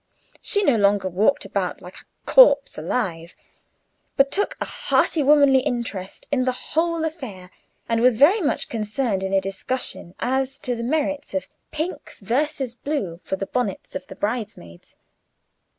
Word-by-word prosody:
She 410 -1 +1
no 280 - +4
longer 200 -2 +3
walked 200 +9 +1
about - - -2
like - - -11
a - - -15 0.2
"corpse 290 - +6
alive," 170 -1 -3 0.8
but 275 0 +4
took 410 +1 0
a - - -2
hearty 320 - +1
womanly 285 -2 +5
interest 230 -7 -4
in 265 -3 +2
the 255 - +1 0.2
whole 330 0 +1
affair, 220 - -7 0.4
and 230 0 +1
was 250 -2 +4
very 345 - +5
much 295 - 0
concerned 215 -1 -2
in 190 0 -3
a 195 - +4
discussion 195 -1 -4
as 265 +1 -1
to 245 - -2
the 235 - -5
merits 290 +3 -2
of 285 - -2 0.2
pink 315 +4 -5
versus 265 +3 -1
blue 240 - -3
for - - -3
the 195 - -4
bonnets 210 -3 -3
of 185 0 -6
the 190 - -10
bridesmaids. 205 - -5
250 Hz, 155 wpm, -23 LUFS, 195-285 Hz, 0.8 s, corpse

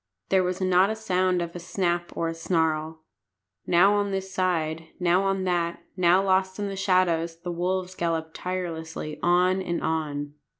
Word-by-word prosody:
There 190 -1 +4
was 180 +1 -2
not 185 +1 +4
a 220 - -1
sound 185 -4 +1
of 170 0 -7
a - - -4
snap 175 -1 -1
or 165 - 0
a 165 - -2
snarl. 160 -1 -1 0.6
Now 185 +4 +5
on 205 -1 +1
this 190 -1 -4
side, 165 -4 -1
now 180 +1 +3
on 195 -1 0
that, 170 -2 -1
now 185 +1 +4
lost 190 -1 +1
in 205 -1 -2
the 195 - -5
shadows, 170 -4 +1
the 175 - -4
wolves 180 +2 -2
galloped 165 -2 -2
tirelessly 165 -4 -5
on 180 +2 +3
and 170 -2 -3
on. 145 -2 -2
180 Hz, 170 wpm, -26 LUFS, 165-185 Hz, 0.6 s, Now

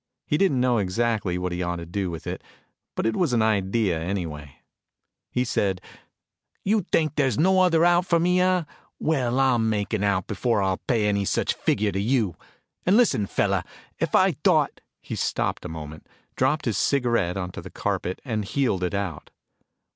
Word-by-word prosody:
He - - 0
didn't 150 -6 +2
know 125 -2 +2
exactly 105 -1 0
what 90 0 -2
he 90 +1 -3
ought 90 0 -1
to 85 -1 -6
do 95 +2 -3
with 85 -2 -7
it, - - -4 0.5
but - - -2
it 115 0 +1
was 165 -8 +1
an 115 -2 +3
idea, 100 -3 +1
anyway. 80 -5 -4 0.7
He 125 - 0
said, 100 -6 0 0.8
"You 210 +2 +2
think 155 -2 +2
there's 135 -7 +1
no 190 +3 +4
other 170 -2 +4
out 175 +1 +3
for 170 - +3
me, 180 +2 +2
huh? 185 -1 +3 0.3
Well, 130 -5 0
I'll 130 -3 +3
make 110 -1 -1
an 105 -2 0
out 100 -3 +1
before 115 -4 0
I'll 95 -1 +1
pay 115 -4 +2
any 100 -1 +1
such - - 0
figure 105 0 0
to 95 - -2
you. 110 -5 +1 0.5
And 190 +4 +4
listen, 160 - +3
fellah, - - 0 0.4
if - - 0
I - - +5
thought - - +2
" - - -59
He - - -5
stopped - - -2
a - - -4
moment, 80 -1 -8 0.3
dropped 145 +4 +1
his 115 -4 0
cigarette 120 -10 +1
onto 90 -1 -5
the - - -10
carpet 90 - -3
and 110 -5 -2
heeled 105 -4 0
it 90 +2 -1
out. 95 -7 -4
110 Hz, 185 wpm, -25 LUFS, 95-135 Hz, 0.8 s, I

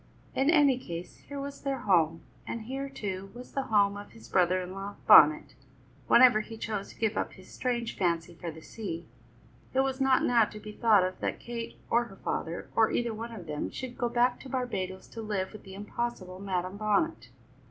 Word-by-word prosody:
In 270 +3 +2
any 290 -6 +5
case, 170 -6 -7
here 285 -1 -5
was 280 0 -6
their 275 -2 -2
home; 165 -7 +3 0.3
and 230 - -4
here, 270 +4 -4
too, 195 -6 -5
was 250 +1 -10
the 275 -1 -2
home 200 -2 +4
of 205 - -10
his 225 - -13
brother 185 0 +3
in 180 0 -5
law, 195 +1 -6
Bonnet, 150 +1 +7 0.5
whenever 240 -3 +7
he 225 +1 -9
chose 210 -3 -3
to - - -14
give 220 -1 +1
up - - -2
his 185 - -15
strange 240 -2 -2
fancy 170 -2 0
for 170 0 -6
the 160 0 -9
sea. 175 -7 -6 0.7
It 265 - +5
was 270 0 -1
not 265 -1 +4
now 235 -3 +5
to 210 - -9
be 210 0 -8
thought 210 -3 +4
of 185 0 -3
that - - -2
Kate 235 -1 -6
or 235 +1 +4
her 195 - -12
father, 170 -3 -3
or 225 -1 +5
either 235 -1 0
one 230 +2 -6
of 205 -7 -8
them, 150 -2 -3
should 255 -2 -6
go 240 - -1
back 245 +1 +2
to 265 - -10
Barbadoes 190 -8 -3
to 230 - -7
live 205 -3 -2
with 215 - -9
the 190 0 -9
impossible 205 -2 -4
Madam 185 -1 -2
Bonnet. 215 +11 0
215 Hz, 205 wpm, -29 LUFS, 185-245 Hz, 0.7 s, Bonnet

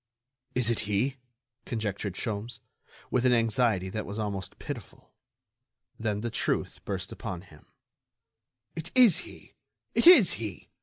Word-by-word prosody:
"Is 120 -2 +2
it 115 - 0
he?" 130 +7 +1 0.5
conjectured 105 -4 -3
Sholmes, 110 +2 -4 0.5
with 125 - +2
an 125 -1 +4
anxiety 115 -4 +2
that 110 +2 -3
was 100 +2 -5
almost 100 -4 -4
pitiful. - - -8 0.9
Then 105 -2 -1
the 120 0 -3
truth - - -2
burst - - -4
upon 90 -2 -6
him: 80 -6 -18 1.1
"It 165 +1 -5
is 245 -7 +7
he! - - -12 0.4
It - - +4
is 265 - +9
he! 105 -7 -7
110 Hz, 135 wpm, -28 LUFS, 100-125 Hz, 1.1 s, is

